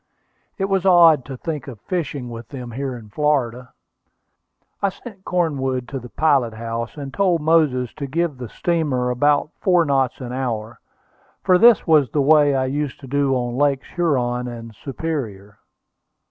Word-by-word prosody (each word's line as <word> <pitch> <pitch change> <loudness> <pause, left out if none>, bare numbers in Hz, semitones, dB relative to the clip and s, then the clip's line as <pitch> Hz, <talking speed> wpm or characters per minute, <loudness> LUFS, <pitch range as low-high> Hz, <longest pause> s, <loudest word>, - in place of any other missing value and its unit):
It 195 - 0
was 195 -2 0
odd 170 -7 +6
to 135 -2 -7
think 150 -1 -5
of 120 -6 -9
fishing 145 -8 -4
with 115 -1 -8
them 125 -4 -7
here 130 +1 -4
in 110 -3 -13
Florida. 125 -2 -1 1.1
I 200 - +2
sent 195 0 -12
Cornwood 135 -8 -1
to 135 - -4
the 125 0 -11
pilot 135 -8 +1
house, 115 +3 -5
and 140 -2 -7
told 180 -2 +2
Moses 150 -6 +2
to 140 - -4
give 155 -1 -2
the 125 -3 -6
steamer 145 -8 -1
about 145 +4 +2
four 180 -3 +3
knots 135 -3 0
an 125 -2 -6
hour, 115 -4 -4 0.6
for 180 -1 +4
this 235 -1 +6
was 150 -6 +4
the 145 - -1
way 145 0 +4
I 130 -1 +1
used 140 +1 -3
to 135 - -10
do 140 0 +1
on 120 -1 -2
Lakes 140 -2 +1
Huron 125 -8 0
and 115 -1 -8
Superior. 110 -7 -5
135 Hz, 165 wpm, -21 LUFS, 125-160 Hz, 1.1 s, odd